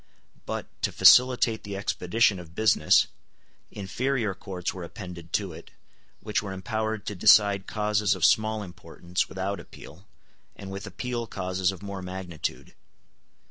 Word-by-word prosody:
But, - - -3 0.2
to - - 0
facilitate 125 -3 +6
the 100 -1 -6
expedition 100 +1 +1
of 85 -1 -12
business, 110 -1 +4 0.6
inferior 110 +2 -2
courts 90 -2 -5
were 90 - -7
appended 85 -1 -9
to 95 -5 -1
it, - - -12 0.5
which 105 -1 -1
were 100 -2 -6
empowered 110 +3 -3
to - - -3
decide 100 +1 +5
causes 105 -2 +1
of 90 -4 +2
small 110 -1 +2
importance 90 -1 -4
without 95 +1 -3
appeal, - - -13 0.5
and 95 -1 -9
with 100 0 -6
appeal 120 -2 -4
causes 95 -1 -1
of 95 0 -11
more 100 -1 -6
magnitude. 90 -3 -5
100 Hz, 140 wpm, -27 LUFS, 95-110 Hz, 0.6 s, facilitate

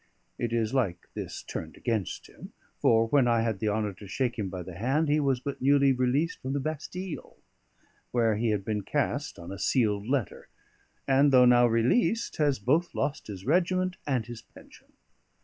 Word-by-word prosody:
It 120 - -2
is 115 0 0
like 100 -10 -1
this - - -6
turned - - -7
against 110 -6 -2
him; - - -13 0.3
for 115 0 +4
when 135 -2 +4
I 115 -1 +3
had 110 -4 -1
the 110 - 0
honour 105 -1 -1
to 100 +2 -12
shake 120 +3 -2
him 100 -3 -2
by 90 -1 -6
the 90 - -9
hand, 135 - 0
he 150 +1 +3
was 135 -3 +1
but 140 +2 -6
newly 140 0 +4
released 130 +6 0
from 130 +1 -3
the 145 - 0
Bastille, 155 +5 -6 0.7
where 115 -3 +2
he 115 +2 0
had 105 -3 -1
been 105 -1 -1
cast 145 +5 -2
on 85 +1 -9
a 100 - -7
sealed 105 -2 +1
letter; 130 -5 -2 0.6
and, 140 +1 +4
though 125 -1 +7
now 120 0 +6
released, 125 - +1
has 145 -3 +2
both 150 - 0
lost 150 - -2
his 95 -2 -8
regiment 185 +3 +1
and 130 -6 0
his 120 -1 -8
pension. - - -18
125 Hz, 185 wpm, -28 LUFS, 110-145 Hz, 0.7 s, though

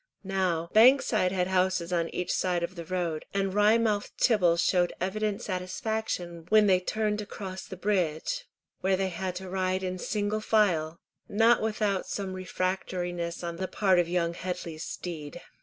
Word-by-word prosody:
Now, 185 -4 -1
Bankside 220 -5 +5
had 185 -1 +1
houses 185 -1 +1
on 170 -1 +1
each 180 - -2
side 180 -2 0
of 170 +2 -3
the 170 -2 -7
road, 170 -3 -2
and 195 -1 0
Wry 210 +2 +5
mouthed 215 -3 0
Tibble 180 -8 +4
showed 175 0 +2
evident 205 +2 -1
satisfaction 185 -2 -3
when 215 -1 +6
they 185 -2 +4
turned 210 +2 -1
to 210 - -5
cross 190 -2 -7
the 190 - -8
bridge, 190 - -1 0.3
where 190 0 +1
they 190 0 0
had 185 +1 -4
to 190 +1 -6
ride 185 0 -1
in 185 0 -3
single 210 +2 -1
file, 175 -8 +2 0.3
not 225 +3 +4
without 210 -3 0
some 195 -2 -3
refractoriness 180 -2 -3
on 170 -1 -4
the 185 +1 -2
part 190 -3 +3
of 170 -1 +1
young 170 -1 0
Headley's 170 -3 -5
steed. 160 -2 -6
185 Hz, 165 wpm, -28 LUFS, 175-205 Hz, 0.3 s, when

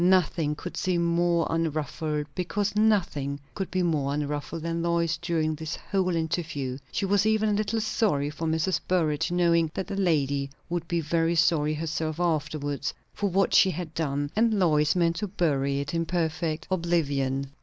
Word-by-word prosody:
Nothing 175 -4 +3
could 180 - -7
seem 175 -2 +1
more 170 0 +2
unruffled, 155 -1 -1
because 195 +4 -1
nothing 185 -10 +1
could 195 -2 -4
be 185 -1 0
more 145 -5 0
unruffled, 150 +2 -3
than 165 0 -2
Lois 170 -1 +1
during 160 -2 0
this 160 +1 -4
whole 185 -3 -1
interview; 160 -5 -2
she - - -1
was 200 +1 +2
even 220 0 +2
a - - +2
little 215 +2 0
sorry 200 -10 0
for 160 +2 -4
Mrs. 160 +2 +1
Burrage, 160 -5 +1
knowing 170 -2 +3
that 190 - -2
the - - -5
lady 145 -7 +1 0.2
would 170 -1 -2
be 170 -1 0
very 165 +2 +1
sorry 155 -2 +3
herself 160 0 -3
afterwards 150 -4 -1 0.2
for 205 - -1
what 195 +2 +2
she 190 - +6
had 170 -2 -5
done; 145 -2 -1
and 225 0 +3
Lois 155 -5 +3
meant 170 -1 +2
to 210 +3 -2
bury 140 -7 0
it 140 +2 -4
in 165 -1 0
perfect 160 -2 -1
oblivion. 140 -6 0
165 Hz, 170 wpm, -27 LUFS, 150-180 Hz, 0.2 s, she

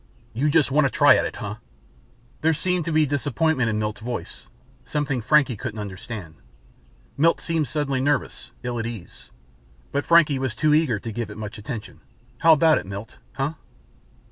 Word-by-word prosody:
"You 135 +7 +1
just 150 -2 +3
want 145 0 +4
a - - -2
try 145 -2 +6
at - - +1
it, - - -8
huh?" 105 +1 -5 0.8
There 160 0 +3
seemed 180 +1 0
to 165 - -2
be 155 0 +4
disappointment 145 -2 0
in 110 - -1
Milt's 105 0 -3
voice; 120 +1 -6 0.4
something 145 -4 -2
Frankie 135 0 +3
couldn't 110 +1 -6
understand. 100 -4 -7 0.8
Milt 165 +4 +3
seemed 165 -3 -1
suddenly 140 -4 -1
nervous, 145 +2 -1
ill 120 -1 -3
at 115 - -2
ease. 115 -7 -9 0.6
But 140 - 0
Frankie 155 -5 +4
was 130 -3 -2
too 150 +6 +2
eager 150 -8 +3
to 115 +3 -6
give 115 0 -4
it 105 - -9
much 110 +1 -7
attention. 110 0 -7 0.4
"How 165 0 +7
about 155 +1 +4
it, - - -10
Milt 100 +3 -8
huh?" 140 +3 -2
135 Hz, 175 wpm, -24 LUFS, 110-150 Hz, 0.8 s, How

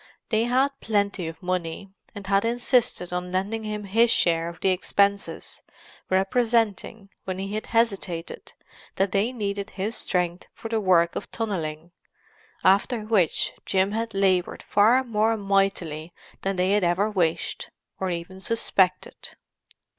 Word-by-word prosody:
They 220 0 +2
had 260 +3 +3
plenty 200 -5 0
of 165 +3 -9
money, 180 +1 -3 0.2
and 200 -1 -8
had 195 +1 +2
insisted 240 -5 +1
on 180 0 -3
lending 200 +4 -2
him 210 -1 -4
his 225 +4 +3
share 165 -5 +2
of 170 - -11
the 190 - +2
expenses, 200 +2 0 0.5
representing, 215 0 0
when 185 -1 -3
he 195 +1 -4
had 215 - -3
hesitated, 200 - -1 0.4
that 195 0 +1
they 205 +5 +1
needed 200 -4 -3
his 210 +4 -3
strength 180 -3 -1
for 225 - -7
the 225 -1 0
work 170 -3 +3
of - - -5
tunnelling—after 190 +3 -2
which 210 -6 +1
Jim 190 +1 +1
had 225 0 -3
laboured 190 -2 +1
far 225 +6 +4
more 225 -1 +1
mightily 195 -5 0 0.3
than 195 0 -1
they 185 +1 +1
had 205 -1 +3
ever 175 +4 +2
wished, 175 -6 -1 0.3
or 190 - -1
even 175 +2 -5
suspected. 190 -4 0
195 Hz, 140 wpm, -25 LUFS, 180-220 Hz, 0.5 s, far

